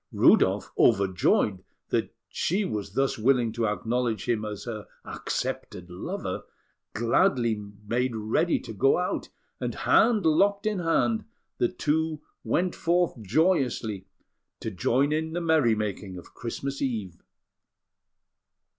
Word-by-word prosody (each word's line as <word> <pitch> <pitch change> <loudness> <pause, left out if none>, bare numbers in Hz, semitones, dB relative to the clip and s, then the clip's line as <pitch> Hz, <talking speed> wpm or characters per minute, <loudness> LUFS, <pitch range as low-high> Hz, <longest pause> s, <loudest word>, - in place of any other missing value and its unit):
Rudolf, - - +4
overjoyed 95 0 +3 0.3
that - - 0 0.2
she 195 +5 0
was 100 - -4
thus 135 -1 0
willing 120 -1 +3
to 115 0 -1
acknowledge 115 +1 -1
him 115 -3 +1
as 105 -2 -5
her 110 -3 -6 0.2
accepted 90 0 -4
lover, 90 - -4 0.5
gladly 115 -1 +2 0.2
made 120 +2 0
ready 110 +11 +1
to 110 - -8
go 135 +6 +3
out; 180 +1 -2 0.3
and, - - -3
hand 220 -5 +3
locked 200 +6 +3
in 210 -3 0
hand, 210 +6 +1 0.3
the 120 - +3
two 155 +3 -1 0.2
went 180 0 0
forth 170 -7 0
joyously 115 - +1 0.5
to 110 - -4
join 125 - +1
in 160 +1 -1
the 175 - -1
merry 155 -9 +3
making 100 -3 -4
of 90 - -12
Christmas 135 +3 -5
Eve. 105 -10 -3
120 Hz, 125 wpm, -27 LUFS, 105-160 Hz, 0.5 s, Rudolf